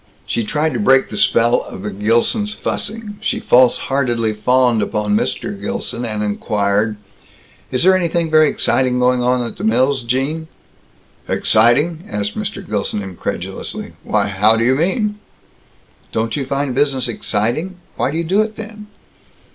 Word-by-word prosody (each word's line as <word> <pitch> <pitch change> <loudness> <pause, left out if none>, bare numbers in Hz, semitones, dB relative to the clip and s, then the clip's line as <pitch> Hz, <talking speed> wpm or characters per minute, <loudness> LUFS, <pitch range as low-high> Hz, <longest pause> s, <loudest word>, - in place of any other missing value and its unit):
She 115 - -1
tried 150 +7 -1
to - - -2
break 135 -10 +4
the - - -5
spell 120 +3 +3
of 95 - -9
the 105 - -3
Gilsons' 115 - +1
fussing. 210 -1 -4
She - - -1
false 125 0 +4
heartedly 120 -5 -1
fawned 120 +1 +2
upon 105 0 0
Mr. 200 - -2
Gilson, 205 - -3
and 105 -2 -3
inquired: 105 0 0 0.7
"Is 130 - 0
there 190 +1 +6
anything 170 -2 0
very 155 -1 +5
exciting 130 -1 +1
going 125 0 +2
on 125 0 +1
at - - -7
the 190 - -7
mills, 140 - +2
Gene?" 135 +7 -2 0.8
"Exciting?" 145 +10 +3
asked 105 0 -3
Mr. - - -4
Gilson 105 - -2
incredulously. 95 -2 -5
"Why, - - +1
how 105 +3 +3
do 115 - +1
you 125 +2 +3
mean?" 210 - 0 0.9
"Don't 110 0 -1
you 135 -3 -3
find 140 -1 -1
business 135 -1 +1
exciting? 120 - -2 0.2
Why - - 0
do 155 - -3
you 170 - 0
do 190 +6 +2
it 215 0 -3
then?" 215 -1 -9
130 Hz, 155 wpm, -18 LUFS, 110-165 Hz, 0.9 s, there